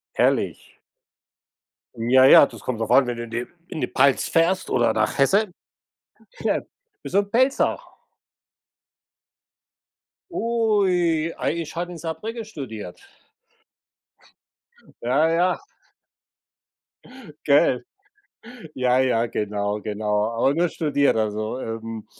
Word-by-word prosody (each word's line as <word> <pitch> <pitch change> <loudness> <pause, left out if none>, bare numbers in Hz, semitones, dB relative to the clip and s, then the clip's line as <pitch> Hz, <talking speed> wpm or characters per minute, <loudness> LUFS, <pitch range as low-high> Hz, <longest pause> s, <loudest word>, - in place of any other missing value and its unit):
Herrlich. - - -1 1.1
Ja, 125 +3 +4
ja, 140 - +8
das - - -12
kommt 120 -3 -4
drauf 110 - -2
an, 135 -2 +5
wenn 120 -1 -3
du 120 - -5
in 115 - -11
die 120 +2 -3 0.2
in 155 - -6
die - - 0
Pfalz 135 0 +2
fährst 175 +3 +1
oder 120 -1 +2
nach 110 0 -1
Hessen. 195 +9 +3 0.9
Ja. - - 0 0.4
Bist - - -8
du - - +5
'n 200 - -6
Pfälzer? 260 +4 +2 2.5
Ui, 190 - +1
ei 170 - -2
ich 160 - -7
habe 175 +1 -4
in 170 - -9
Saarbrücken 210 +9 -5
studiert. 115 - -8 2.0
Ja, 140 +7 +2
ja. 175 +3 +1 1.9
Gell. 140 -3 +3 0.9
Ja, 125 0 +2
ja. 125 -3 +2
Genau, 105 -1 -2
genau, 105 0 -1
aber 115 +4 +1
nur 175 +3 +1
studiert, 145 -6 +1
also, 110 +2 -2
ähm, 115 -2 -6
135 Hz, 115 wpm, -23 LUFS, 115-170 Hz, 2.5 s, ja